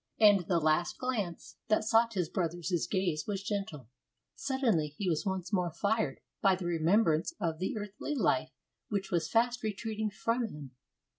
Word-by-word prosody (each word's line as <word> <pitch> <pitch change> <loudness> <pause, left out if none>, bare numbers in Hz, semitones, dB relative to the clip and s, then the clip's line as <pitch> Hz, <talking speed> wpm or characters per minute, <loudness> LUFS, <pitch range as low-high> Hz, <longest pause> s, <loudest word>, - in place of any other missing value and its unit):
And 205 -5 +6
the 175 - +2
last 155 +2 +1
glance 215 -10 -3
that 215 -1 +3
sought 225 +1 +3
his 180 -4 +1
brother's 175 0 -1
gaze 180 -6 0
was 200 -2 -2
gentle. 195 - -4 0.5
Suddenly 235 - 0
he 200 - -2
was 170 +3 0
once 190 0 -3
more 180 -3 +2
fired 215 +6 -1 0.2
by 195 -2 +5
the 180 -1 -6
remembrance 170 - +2
of 165 -4 -1
the 190 +4 -2
earthly 210 +8 -4
life - - +2 0.4
which 200 -2 -2
was 170 -2 0
fast 240 +3 +2
retreating 220 0 -2
from 230 +3 -1
him. 150 - -9
195 Hz, 160 wpm, -31 LUFS, 170-220 Hz, 0.5 s, And